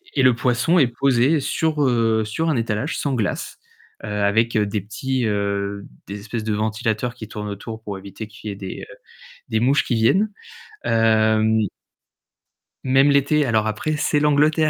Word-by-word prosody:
et 135 - +3
le 130 -1 +6
poisson 125 +8 +2
est 135 - +5
posé 135 +4 +2
sur, 155 +2 0
heu, 115 -4 +2
sur 160 +10 -1
un 155 - +1
étalage 115 +5 -2
sans 140 - -1
glace, 110 -7 -3 0.4
heu, - - -5
avec 105 +3 +1
des 105 -1 0
petits, 125 +5 -2
heu, 100 -1 -2 0.2
des 100 +1 -6
espèces 110 +2 -5
de 110 - 0
ventilateurs 110 +2 -1
qui 110 -3 -8
tournent 105 -1 -6
autour 110 +3 -7
pour 100 -2 -5
éviter 100 +3 -8
qu'il 110 0 -9
y 100 - -3
ait - - -10
des, 95 -1 -7
heu, - - -12 0.5
des 110 - 0
mouches 135 +5 +3
qui 125 - -1
viennent, 185 - +3 0.5
hem 110 -1 +3 1.3
Même 135 +2 +4
l'été, 140 +1 +3
alors 110 -3 +1
après 150 +9 -2
c'est 150 0 +1
l'Angleterre. 150 +1 +3
115 Hz, 170 wpm, -21 LUFS, 105-135 Hz, 1.3 s, le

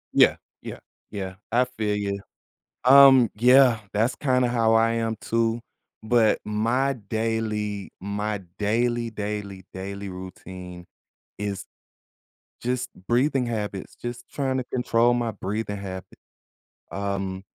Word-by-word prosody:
Yeah, - - +6 0.3
yeah, - - -7 0.3
yeah, 95 -2 -5 0.2
I 125 +2 +4
feel 110 -4 -2
you. 100 -1 -2 0.7
Um, 135 -3 +8
yeah, 125 0 +6
that's 115 +5 +1
kinda 125 -3 +2
how 115 -2 +2
I 115 0 +4
am 115 -1 -1
too. 115 0 0 0.4
But 110 -1 +3
my 115 +6 +1
daily 105 -2 -2
my 105 +1 -2 0.2
daily, 115 +2 0
daily, 100 -3 -5
daily 100 +1 -6
routine 90 -1 -9 0.5
is, 100 -2 -4 1.0
just 125 +1 -1 0.2
breathing 130 +1 +2
habits, 105 -4 -4
just 120 0 -5
trying 135 -2 -1
to 130 - -1
control 120 -1 +2
my 120 -2 0
breathing 105 +1 -3
habit. 95 -2 -8 0.7
Um, 95 -1 -3
110 Hz, 115 wpm, -25 LUFS, 100-120 Hz, 1.0 s, Um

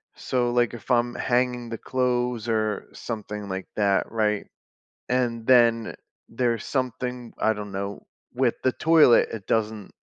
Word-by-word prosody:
so, 125 -2 -1
like, 120 0 +2
if 120 - -10
I'm 120 0 +2
hanging 125 -1 0
the 115 - -4
clothes 125 -2 -1
or 110 -2 -1
something 105 -2 -6
like 95 0 -4
that, 100 -2 +1
right, 105 -2 0 0.6
and 120 -2 0
then 115 -3 +4 0.3
there's 115 -2 -1
something, 125 -2 -3
I 110 - +3
don't 105 -1 -7
know, 100 +1 -5 0.3
with 125 -1 +2
the 130 - +3
toilet, 155 -6 +5
it 110 -4 -7
doesn't, 110 -2 -1
115 Hz, 145 wpm, -25 LUFS, 110-125 Hz, 0.6 s, toilet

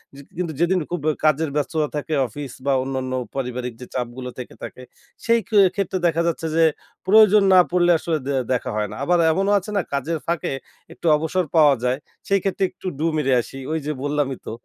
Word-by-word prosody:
যে 140 - -11 0.2
কিন্তু 175 -3 -2
যেদিন 175 +2 +2
খুব 175 - -2
ব্যা 155 - +3
কাজের 155 +1 +2
ব্যস্ততা 150 +1 0
থাকে 150 +2 -3
অফিস 140 +3 -7
বা 140 - +2
অন্যান্য 130 -1 -3 0.2
পারিবারিক 125 -2 -3
যে - - -6
চাপগুলো 125 0 -4
থেকে 125 - -8
থাকে 130 - -8 0.4
সেই 230 0 +4
কে 215 -3 +4 0.2
ক্ষেত্রে 195 -2 -1
দেখা 165 0 +1
যাচ্ছে 165 -1 -2
যে 165 - +4 0.4
প্রয়োজন 210 0 +6
না 185 - +8
পড়লে 175 0 +3
আসলে 160 0 -1
দে 140 - 0 0.2
দেখা 125 - -2
হয় 105 -1 -1
না। - - -7
আবার 175 +4 +2
এমনও 195 +5 +1
আছে 200 +3 -9
না - - +3
কাজের 145 +4 -1
ফাঁকে 170 -4 -1 0.4
একটু - - -13
অবসর 165 +4 -1
পাওয়া 150 -3 +6
যায়। 125 +1 +1 0.3
সেই 200 0 +3
ক্ষেত্রে 195 0 -1
একটু - - -9
ডু 160 - +1
মেরে 135 -3 +1
আসি। 135 - -11
ওই 160 - 0
যে 150 - -1
বললামই 145 -2 -1
তো - - -5
155 Hz, 205 wpm, -22 LUFS, 135-175 Hz, 0.4 s, না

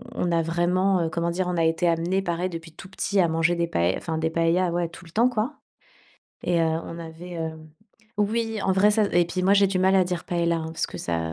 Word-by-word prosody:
on 175 - -1
a 165 -1 +2
vraiment, 175 +3 +1
heu, 160 - -1
comment 170 +1 -1
dire? 180 +1 -1
On 180 -1 -2
a 165 - +2
été 165 +2 +1
amené 170 +4 0
pareil 175 0 -2
depuis 165 -1 -8
tout 185 - -12
petit 195 0 -1
à 175 - +4
manger 165 +2 +1
des 170 0 0
paë 85 - +1
enfin 160 -2 -4
des 160 0 0
paëlla 170 +2 +2 0.2
tout 170 - -13
le 165 - -15
temps, 235 +5 +3
quoi. 240 +5 -2 0.9
Et 175 -1 +1
heu, - - +3
on 165 +1 -3
avait, 170 +2 -8
heu, 160 -1 -3 0.7
oui, 225 +1 0
en 190 - +2
vrai 200 +3 +4
ça 215 0 +3
et 175 0 +4
puis, 185 +1 -3
moi, 195 +2 +4
j'ai 200 0 +5
du 190 -1 -1
mal 190 +1 +3
à 185 - +4
dire 180 -1 -3
paëlla, 170 -1 0
hein 160 -1 -4
parce - - -1
que 90 - -9
ça 85 -1 -2
175 Hz, 250 wpm, -25 LUFS, 165-190 Hz, 0.9 s, j'ai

